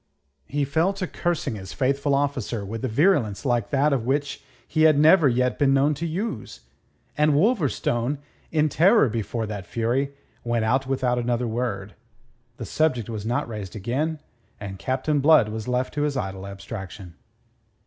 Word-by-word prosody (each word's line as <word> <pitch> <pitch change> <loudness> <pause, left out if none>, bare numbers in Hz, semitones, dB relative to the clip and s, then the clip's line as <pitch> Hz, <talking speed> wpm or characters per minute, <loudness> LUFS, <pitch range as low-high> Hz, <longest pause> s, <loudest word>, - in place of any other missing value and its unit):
He 145 0 -1
fell 160 +7 +1
to 195 -1 -3
cursing 175 -6 -2
his 95 -3 -8
faithful 140 +2 +1
officer 130 -7 -1
with 110 +3 -6
a - - +1
virulence 120 - +2
the 135 - -1
like 120 -4 0
of 140 -3 +2
which 140 +3 -1 0.2
he 155 - 0
had 155 -2 +6
never 155 0 +6
yet 125 +1 0
been 135 -2 +4
known 140 +3 +3
to 165 +4 -3
use. 160 - -4 0.5
And 150 -1 +3
Wolverstone, 145 - +1 0.3
in 155 -1 +3
terror 170 - +4
before 115 +1 -3
that 105 -3 -6
fury, 130 +5 -1 0.3
went 120 -2 0
out 130 +4 +1
without 130 -2 0
another 120 0 -1
word. 110 -4 -3 0.6
The - - -6
subject 130 -9 0
was 110 -1 -5
not 120 0 -1
raised 105 -4 -7
again, 140 +10 -2 0.4
and 95 -2 -7
Captain 130 +7 0
Blood 145 -6 +5
was 110 +1 -5
left 125 +1 -1
to 150 - -2
his 145 -2 0
idle 95 -4 -4
abstraction. 95 -2 -8
130 Hz, 165 wpm, -24 LUFS, 110-150 Hz, 0.6 s, had